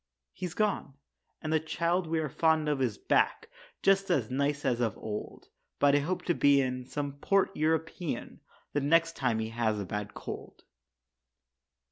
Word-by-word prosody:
He's 180 -2 -5
gone, 210 -10 0 0.5
and 155 0 -1
the 160 - +4
child 170 +3 0
we 165 +1 0
are 155 -1 0
fond 160 +2 +2
of 145 -3 0
Is 120 -5 0
back, - - +1 0.3
just 195 0 +4
as 130 -10 +1
nice 140 +2 0
as 120 -1 +1
of 115 -4 0
old. 105 -1 -6 0.3
But 145 0 +4
I - - +5
hope 180 +5 -2
to 175 - +1
be 140 -3 +5
in 130 -1 -1
some 140 0 -4
port 195 +5 +2
European 160 +1 -1 0.3
The 145 - +1
next 165 +3 +3
time 125 -4 +1
he 110 0 -2
has 110 -2 0
a 100 - -3
bad 105 +2 -5
cold. - - -8
145 Hz, 170 wpm, -30 LUFS, 125-165 Hz, 0.5 s, I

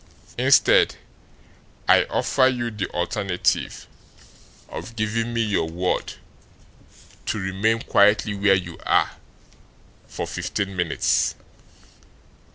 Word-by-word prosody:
Instead, - - +4 0.9
I - - +5
offer 130 - +2
you 120 -2 -1
the 105 -3 -4
alternative 90 +1 -1 0.8
of 115 - -8
giving 115 +2 -1
me 115 0 0
your 100 -7 0
word 90 +2 -2 1.1
to - - -1
remain 100 +4 0
quietly 105 +1 +3
where 100 -1 +3
you 85 -3 -5
are - - +2 1.0
for - - -5
fifteen 100 -1 -4
minutes." 90 -4 +1
100 Hz, 95 wpm, -23 LUFS, 95-115 Hz, 1.1 s, I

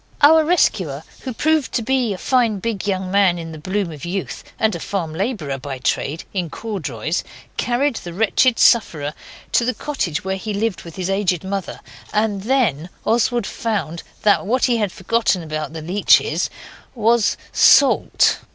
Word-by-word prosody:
Our 315 +2 +7
rescuer, 185 - +1 0.2
who 260 - -5
proved 310 +3 0
to 235 - 0
be 255 -1 +1
a 195 - -3
fine 235 0 +1
big 210 0 -3
young 190 -2 -1
man 195 -3 +3
in 165 -1 -7
the 155 - -9
bloom 190 +2 -2
of 150 -3 -10
youth, 185 +2 -4
and 220 -1 +1
a 170 - -4
farm 165 -3 -3
labourer 165 - -3
by 135 0 -6
trade, 140 +4 -2
in 180 -4 -2
corduroys, 160 - -3 0.3
carried 250 +2 0
the 175 - -7
wretched 225 +6 +2
sufferer 155 - +3 0.4
to - - +3
the 250 +1 -1
cottage 190 - -3
where 190 0 -1
he 210 +2 -4
lived 215 -1 -1
with 165 -2 -11
his 185 0 -2
aged 195 -3 0
mother; 195 0 -4 0.3
and 210 -2 0
then 205 - +1 0.2
Oswald 235 0 +1
found 195 -9 -3 0.2
that 205 - +4
what 250 +3 +2
he 245 -2 +2
had 210 -4 -1
forgotten 195 -2 0
about 155 -1 -4
the 160 -1 -6
leeches 185 +5 +3 0.5
was 230 -1 +2
SALT. 280 - +4
200 Hz, 170 wpm, -20 LUFS, 170-230 Hz, 0.5 s, Our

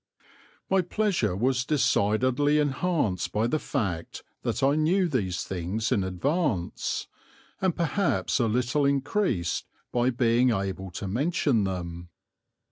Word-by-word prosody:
My 190 0 +3
pleasure 180 - 0
was 125 +4 +1
decidedly 130 +1 +2
enhanced 145 - 0
by 110 +2 +1
the 155 +6 0
fact 85 - -3 0.2
that - - -2
I 140 +1 +4
knew 170 +5 +2
these 100 - -1
things 95 +5 -3
in 100 - +2
advance, 95 - -1 0.6
and 185 -3 +1
perhaps 175 -2 0
a 120 - +2
little 125 +6 +1
increased 140 - 0 0.2
by 120 +1 +2
being 120 0 +3
able 95 -3 -2
to 95 +3 -6
mention 130 - +1
them. 85 -2 -5
125 Hz, 125 wpm, -27 LUFS, 95-150 Hz, 0.6 s, I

